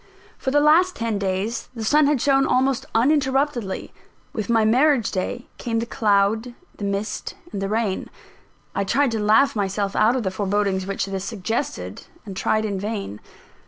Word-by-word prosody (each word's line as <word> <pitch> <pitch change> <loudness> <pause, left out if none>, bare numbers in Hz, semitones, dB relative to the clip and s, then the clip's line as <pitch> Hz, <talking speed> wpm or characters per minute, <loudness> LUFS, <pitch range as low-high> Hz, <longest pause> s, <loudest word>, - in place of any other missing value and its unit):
For - - -3
the 290 +2 +4
last 325 +5 +4
ten 225 -3 -2
days 195 +4 -2
the 225 - -5
sun 300 +5 +4
had 290 -2 +2
shone 275 +1 +3
almost 260 0 +1
uninterruptedly 265 -4 +1 0.4
with 215 -1 -4
my 225 -2 +3
marriage 255 +1 +3
day 195 +6 -3
came 230 -1 -2
the 230 - 0
cloud, 220 +2 +1 0.2
the - - -7
mist 200 +1 -3 0.2
and 195 - -4
the 195 - -2
rain. 215 -3 -1 0.6
I 200 - 0
tried 275 +6 +2
to 225 - -1
laugh 220 +7 +4
myself 200 -1 -1
out 220 +4 +4
of 255 - -1
the 190 - -1
forebodings 195 -1 0
which 195 -1 -1
this 195 -1 -4
suggested, 190 - -4 0.2
and 195 -2 -7
tried 215 +3 +1
in 200 -2 -2
vain. 200 - -4
220 Hz, 170 wpm, -23 LUFS, 200-255 Hz, 0.6 s, the